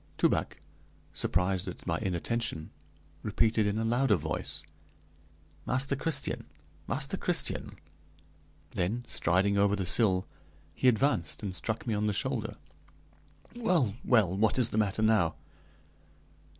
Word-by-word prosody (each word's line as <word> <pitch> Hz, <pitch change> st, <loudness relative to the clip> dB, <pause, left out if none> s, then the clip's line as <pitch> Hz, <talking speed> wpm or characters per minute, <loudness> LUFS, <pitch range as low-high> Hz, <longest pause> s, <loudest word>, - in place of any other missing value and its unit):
Toubac, -, -, +1 dB, 0.6 s
surprised 90 Hz, +1 st, 0 dB
at 90 Hz, -, -7 dB
my 85 Hz, -2 st, 0 dB
inattention, 95 Hz, -2 st, -2 dB, 0.5 s
repeated 110 Hz, 0 st, +2 dB
in 100 Hz, +1 st, 0 dB
a 110 Hz, -, 0 dB
louder 120 Hz, 0 st, +3 dB
voice: -, -, -3 dB, 1.0 s
"Master 135 Hz, +2 st, +2 dB
Christian, 140 Hz, 0 st, 0 dB, 0.4 s
Master -, -, -1 dB
Christian!" -, -, -1 dB, 1.0 s
Then, 105 Hz, +7 st, -2 dB
striding 95 Hz, +3 st, +2 dB
over 100 Hz, 0 st, +3 dB
the 95 Hz, -2 st, -2 dB
sill, 95 Hz, 0 st, +4 dB, 0.5 s
he 130 Hz, -, +1 dB
advanced 120 Hz, -, +2 dB
and 95 Hz, -3 st, -4 dB
struck 110 Hz, +4 st, -3 dB
me 115 Hz, -, -1 dB
on 105 Hz, 0 st, 0 dB
the 105 Hz, -, +1 dB
shoulder. 115 Hz, 0 st, -2 dB, 1.0 s
"Well, 180 Hz, -, +2 dB
well, 105 Hz, -7 st, +3 dB
what 105 Hz, +3 st, +2 dB
is 125 Hz, -3 st, +2 dB
the -, -, -2 dB
matter 105 Hz, +1 st, 0 dB
now?" 110 Hz, -7 st, +3 dB
105 Hz, 125 wpm, -30 LUFS, 95-120 Hz, 1.0 s, sill